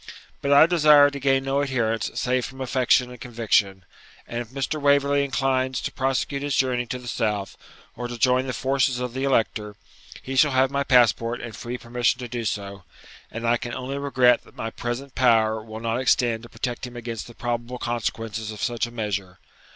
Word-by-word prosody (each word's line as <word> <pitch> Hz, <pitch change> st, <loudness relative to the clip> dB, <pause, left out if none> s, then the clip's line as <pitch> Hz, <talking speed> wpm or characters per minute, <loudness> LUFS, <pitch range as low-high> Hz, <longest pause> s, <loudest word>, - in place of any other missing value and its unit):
But 140 Hz, -, -1 dB
I 140 Hz, +2 st, +8 dB
desire 150 Hz, -4 st, +6 dB
to 140 Hz, -, -6 dB
gain 135 Hz, 0 st, +2 dB
no 135 Hz, +1 st, 0 dB
adherents 115 Hz, -5 st, -1 dB
save 125 Hz, 0 st, 0 dB
from 135 Hz, +1 st, -8 dB
affection 125 Hz, -1 st, +2 dB
and 125 Hz, -, -12 dB
conviction; 105 Hz, -5 st, 0 dB, 0.4 s
and 120 Hz, -, -4 dB
if 120 Hz, -, -8 dB
Mr. 135 Hz, +3 st, -3 dB
Waverley 140 Hz, 0 st, +3 dB
inclines 130 Hz, -1 st, 0 dB
to -, -, -3 dB
prosecute 135 Hz, +1 st, -1 dB
his 145 Hz, -1 st, -1 dB
journey 125 Hz, -2 st, +1 dB
to 125 Hz, -, -4 dB
the 125 Hz, -1 st, -11 dB
south, 105 Hz, -4 st, -2 dB, 0.4 s
or 120 Hz, +1 st, -4 dB
to 120 Hz, 0 st, -6 dB
join 130 Hz, +2 st, +2 dB
the 130 Hz, -, -2 dB
forces 130 Hz, -1 st, +1 dB
of 125 Hz, -1 st, -4 dB
the 130 Hz, +1 st, -2 dB
Elector, 110 Hz, -5 st, 0 dB, 0.5 s
he 135 Hz, -, -5 dB
shall 140 Hz, +1 st, +4 dB
have 130 Hz, +1 st, +3 dB
my 140 Hz, 0 st, 0 dB
passport 120 Hz, -2 st, +3 dB
and 115 Hz, -2 st, -7 dB
free 120 Hz, +1 st, -5 dB
permission 120 Hz, 0 st, 0 dB
to 125 Hz, -1 st, -6 dB
do 120 Hz, -1 st, -4 dB
so; 100 Hz, -2 st, -4 dB, 0.5 s
and 115 Hz, +1 st, -4 dB
I 120 Hz, +1 st, +3 dB
can 120 Hz, +1 st, -6 dB
only 135 Hz, +2 st, -4 dB
regret 130 Hz, -3 st, +3 dB
that -, -, -20 dB
my 115 Hz, -, -4 dB
present 125 Hz, +4 st, -5 dB
power 110 Hz, -3 st, +3 dB
will 110 Hz, 0 st, -8 dB
not 115 Hz, +2 st, -1 dB
extend 120 Hz, -3 st, +2 dB
to 120 Hz, -, -12 dB
protect 120 Hz, +2 st, -4 dB
him 125 Hz, -, -12 dB
against 115 Hz, -2 st, -6 dB
the 120 Hz, -, -13 dB
probable 120 Hz, +1 st, -3 dB
consequences 115 Hz, -2 st, -3 dB
of 105 Hz, -, -7 dB
such 120 Hz, -1 st, -1 dB
a -, -, -11 dB
measure. 100 Hz, -5 st, -4 dB
125 Hz, 200 wpm, -24 LUFS, 115-135 Hz, 0.5 s, I